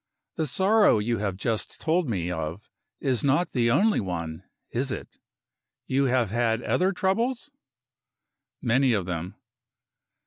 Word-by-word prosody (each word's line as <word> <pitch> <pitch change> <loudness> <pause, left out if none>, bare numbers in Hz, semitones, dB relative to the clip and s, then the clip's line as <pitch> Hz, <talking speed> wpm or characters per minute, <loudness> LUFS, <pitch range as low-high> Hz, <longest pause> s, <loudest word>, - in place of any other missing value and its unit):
The 160 - -1
sorrow 195 - +4
you 110 +1 -1
have 100 -3 -2
just 110 +2 -3
told 165 -2 +1
me 90 -5 -1
of 80 +4 -5 0.3
is 130 -4 0
not 145 +5 +2
the 120 -3 +2
only 205 - +3
one 85 -3 -4 0.3
is - - -1
it? - - -7 0.7
You 135 +1 +1
have 125 -5 +1
had 115 0 +1
other 185 +2 +2
troubles?" 230 +9 -1 1.1
"Many 125 +1 +3
of 100 -5 0
them." 90 0 -4
120 Hz, 135 wpm, -26 LUFS, 100-165 Hz, 1.1 s, sorrow